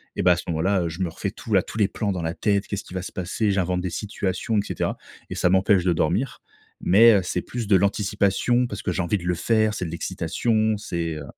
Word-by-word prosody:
Et -, -, -1 dB
bah, 90 Hz, -, +5 dB
à -, -, 0 dB
ce -, -, -5 dB
moment-là, 90 Hz, +3 st, +1 dB
heu, 85 Hz, -, -1 dB
je 80 Hz, +4 st, -7 dB
me 90 Hz, -, 0 dB
refais 95 Hz, +4 st, -4 dB
tout 110 Hz, -1 st, -6 dB
la 95 Hz, -, +5 dB
tous -, -, -9 dB
les 100 Hz, -, +4 dB
plans 105 Hz, -2 st, -2 dB
dans 90 Hz, -3 st, -3 dB
la 80 Hz, 0 st, -2 dB
tête 100 Hz, -2 st, 0 dB
«Qu'est-ce 100 Hz, -, -4 dB
qu'il 90 Hz, -, -11 dB
va 90 Hz, -, -2 dB
se -, -, -7 dB
passer?», 100 Hz, +4 st, -1 dB
j'invente 90 Hz, -2 st, 0 dB
des 90 Hz, -, -2 dB
situations, 100 Hz, +2 st, -2 dB
et -, -, +4 dB
cetera -, -, -3 dB, 0.3 s
et -, -, -5 dB
ça 90 Hz, -, +2 dB
m'empêche 95 Hz, 0 st, +3 dB
de 90 Hz, -, +3 dB
dormir 90 Hz, -, -1 dB, 0.4 s
mais, 110 Hz, +5 st, +7 dB
heu, 100 Hz, -, +4 dB
c'est -, -, -2 dB
plus 120 Hz, -4 st, -5 dB
de 100 Hz, -, +5 dB
l'anticipation 100 Hz, +5 st, +1 dB
parce 100 Hz, -, -6 dB
que 90 Hz, -, -1 dB
j'ai 90 Hz, -, -1 dB
envie 95 Hz, +4 st, 0 dB
de 85 Hz, -, -9 dB
le 90 Hz, 0 st, 0 dB
faire. 110 Hz, +3 st, +2 dB
C'est 90 Hz, -, -3 dB
de -, -, -4 dB
l'excitation, 105 Hz, +6 st, 0 dB
c'est, 85 Hz, -5 st, -3 dB
heu 75 Hz, -, -6 dB
95 Hz, 265 wpm, -24 LUFS, 90-105 Hz, 0.4 s, mais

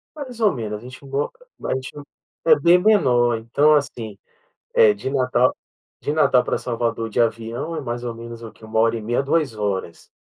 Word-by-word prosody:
Mais 255 Hz, -6 st, -8 dB
ou 215 Hz, -3 st, +4 dB
menos, 110 Hz, -4 st, -4 dB
a -, -, -14 dB
gente 130 Hz, +2 st, -11 dB
a -, -, -11 dB
mo 140 Hz, +2 st, -2 dB, 0.3 s
a -, -, 0 dB
gente 130 Hz, 0 st, -5 dB, 0.5 s
é 475 Hz, -2 st, +6 dB
bem 175 Hz, +1 st, +5 dB
menor 125 Hz, -, +3 dB
então 140 Hz, +7 st, +3 dB
assim, 115 Hz, -8 st, -2 dB, 0.6 s
eh, 460 Hz, -3 st, +6 dB
de 135 Hz, -, -5 dB
Natal 130 Hz, -2 st, +2 dB, 0.5 s
de 145 Hz, -, -2 dB
Natal 150 Hz, -5 st, +3 dB
pra -, -, -1 dB
Salvador 115 Hz, -1 st, -2 dB
de 120 Hz, -, 0 dB
avião 115 Hz, +7 st, -1 dB
é 155 Hz, -, -3 dB
mais 120 Hz, -2 st, -5 dB
ou 120 Hz, -1 st, -4 dB
menos 115 Hz, 0 st, -9 dB
o 115 Hz, -, -9 dB
que, -, -, -18 dB
1h30 115 Hz, +2 st, 0 dB
2h, 105 Hz, -, -2 dB
120 Hz, 180 wpm, -22 LUFS, 115-145 Hz, 0.6 s, é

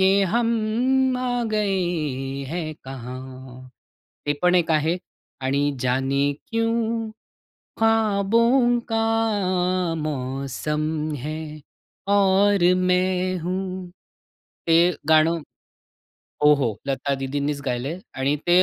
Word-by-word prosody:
ये 195 Hz, +1 st, +4 dB
हम 235 Hz, -1 st, +2 dB, 0.7 s
आ 250 Hz, -1 st, -1 dB, 0.2 s
गए 165 Hz, -10 st, -1 dB
है 175 Hz, +1 st, -2 dB, 0.2 s
कहाँ. 130 Hz, 0 st, -9 dB, 0.6 s
ते 145 Hz, -, +2 dB
पण 180 Hz, 0 st, +4 dB
एक 175 Hz, -2 st, +2 dB
आहे 160 Hz, +2 st, +2 dB, 0.5 s
आणि 140 Hz, +2 st, +1 dB, 0.2 s
जाने 135 Hz, +2 st, +1 dB, 0.2 s
क्यों 230 Hz, -1 st, -1 dB, 0.7 s
खाबों 225 Hz, +3 st, +3 dB
का 225 Hz, 0 st, +1 dB, 1.0 s
मौसम 140 Hz, +1 st, -3 dB, 0.4 s
है 155 Hz, +1 st, -4 dB, 0.7 s
और 200 Hz, -1 st, +4 dB
मैं 185 Hz, 0 st, +1 dB
हूँ. 185 Hz, +1 st, -4 dB, 0.8 s
ते 170 Hz, +1 st, +4 dB
गाणं 160 Hz, +1 st, +4 dB, 1.0 s
हो, 150 Hz, 0 st, +8 dB
हो. 120 Hz, -7 st, -1 dB
लता 140 Hz, +1 st, -1 dB
दीदींनीच 140 Hz, +2 st, -2 dB
गायलंय 130 Hz, +7 st, -2 dB, 0.2 s
आणि 140 Hz, +3 st, +1 dB
ते 175 Hz, +1 st, +6 dB
170 Hz, 95 wpm, -23 LUFS, 140-195 Hz, 1.0 s, हो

